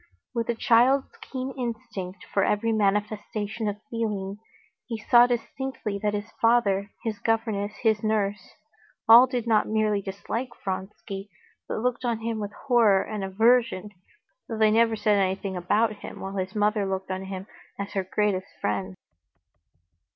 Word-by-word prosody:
With 230 -2 -2
a 235 - +1
child's 245 +4 +4
keen 260 0 -5
instinct 210 -7 -5
for 195 - +3
every 220 +2 +1
manifestation 210 +1 -1
of 205 0 -2
feeling, 210 -4 -3 0.5
he 230 -2 -3
saw 240 +3 +6
distinctly 245 -3 -3
that 210 -1 0
his 205 +1 -5
father, 205 -4 +3
his 220 -3 -3
governess, 220 -2 0
his 220 -2 +3
nurse,—all 220 +3 +2
did 245 -2 -2
not 220 -2 +3
merely 215 -2 +1
dislike 200 +6 -4 0.2
Vronsky, 195 +1 -5 0.4
but - - -3
looked 250 +1 -1
on 235 -2 -1
him 225 -1 -2
with 205 -1 -4
horror 230 -7 +4
and 210 -2 -5
aversion, 220 0 +2 0.6
though 225 - -3
they 215 -1 +4
never 225 0 +4
said 210 -1 +2
anything 190 0 -1
about 210 +5 +1
him, - - -9
while 195 +1 -6
his 190 +2 -3
mother 210 -1 +1
looked 190 0 -3
on 190 +1 -3
him 190 0 -6 0.3
as 200 0 -5
her 195 - 0
greatest 190 0 0
friend. 95 -3 -2
210 Hz, 150 wpm, -26 LUFS, 195-230 Hz, 0.6 s, saw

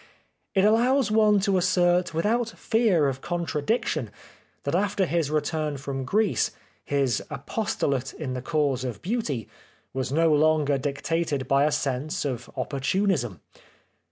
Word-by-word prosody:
It 190 0 +4
allows 235 +2 +3
one 215 -1 +4
to 195 -2 +2
assert 180 0 +2
without 220 +8 0
fear 215 -10 +2
of 135 0 -3
contradiction 175 - -1 0.5
that - - -2
after 195 +1 +1
his 165 -3 0
return 155 -1 -1
from 135 -1 -4
Greece, 210 +8 +1 0.3
his 135 -6 0
apostolate 140 - -2
in 135 -5 -5
the 125 - -4
cause 140 -3 0
of 125 -3 -5
Beauty 170 - -2 0.5
was 130 0 -2
no 160 +1 +3
longer 150 -2 +3
dictated 145 0 -2
by 140 +1 +4
a 150 - +2
sense 145 0 -2
of 125 -3 -4
opportunism. 140 - -1
155 Hz, 130 wpm, -26 LUFS, 135-195 Hz, 0.5 s, It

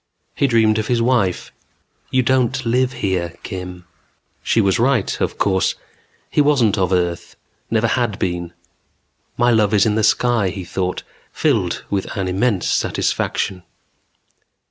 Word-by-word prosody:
He 140 - +1
dreamed 110 -3 +3
of 110 - -3
his 120 -1 +1
wife. 115 -7 0 0.6
"You 130 0 +2
don't 130 0 +1
live 125 +2 +1
here, 90 -3 -1
Kim." 90 -1 -7 0.6
She - - +1
was 100 +1 +2
right, 120 -3 +1
of - - -1
course. 95 -2 +1 0.6
He - - +3
wasn't 135 -8 +3
of 95 -3 0
earth. 85 -2 -1 0.3
Never 115 0 +1
had 115 -3 0
been. 85 -1 -3 0.8
My 120 0 +3
love 110 -2 +3
is 100 - +4
in 110 - +2
the 110 0 0
sky, 120 -3 +2
he 95 -1 -6
thought, 90 +1 -3 0.3
filled 110 - 0
with 100 -2 -1
an 95 -1 -1
immense 95 +1 0
satisfaction. 95 -2 -1
105 Hz, 145 wpm, -19 LUFS, 95-120 Hz, 0.8 s, is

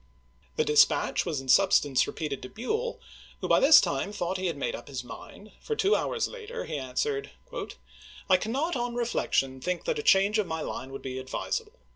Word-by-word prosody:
The 155 - +1
dispatch 150 +4 +3
was 155 -5 -1
in 135 - -12
substance 145 -4 +4
repeated 150 -4 -4
to 130 - -8
Buell, 445 - -3 0.4
who - - -3
by - - +5
this 295 +2 +8
time 145 +8 -1
thought 185 -2 -2
he 185 - -1
had 165 -4 -3
made 140 - -2
up - - -10
his 130 -3 -5
mind, 200 +11 -11
for 445 - -3
two 425 -1 +3
hours 470 - -1
later 475 -1 -7
he 155 - -5
answered: 415 - -2 0.5
" - - -20
I 185 - +6
cannot, 275 - -1
on 240 -1 -2
reflection, 135 - 0
think 180 +3 -3
a - - +2
change 200 - +4
of 205 - 0
my 160 0 -3
line 135 -3 -5
would 135 - -8
be 130 -1 -4
advisable. 425 - -4
190 Hz, 195 wpm, -28 LUFS, -, 0.5 s, this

